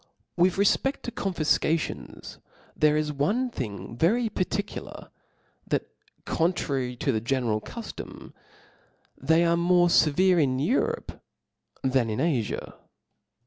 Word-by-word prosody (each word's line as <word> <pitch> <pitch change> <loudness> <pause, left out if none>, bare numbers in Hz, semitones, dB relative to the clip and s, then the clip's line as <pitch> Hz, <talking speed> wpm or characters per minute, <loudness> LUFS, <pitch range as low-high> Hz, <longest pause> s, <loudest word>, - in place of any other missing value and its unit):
WI 180 +1 +4
T - - -8
JI 195 - +1
rcfpeft 270 +7 +1
to 240 - -4
conBfcations, 165 -5 -1 0.4
there 150 0 +3
is 150 -1 -1
one 215 - 0
thing 115 - -6
.very 220 - +2
particular, 205 0 -4 0.6
that - - -2 0.3
contrary 140 -7 -1
to 135 +3 0
the 110 -3 -1
general 120 -3 0
cuftom, - - -9 0.8
they 160 +5 +2
are 170 0 +3
more 175 +1 +4
fevere 175 +3 +4
in 130 -3 +1
Europe 270 - -1 0.6
than 130 -3 +2
in 110 - -2
Afia. 135 -10 -1
160 Hz, 120 wpm, -26 LUFS, 130-185 Hz, 0.8 s, WI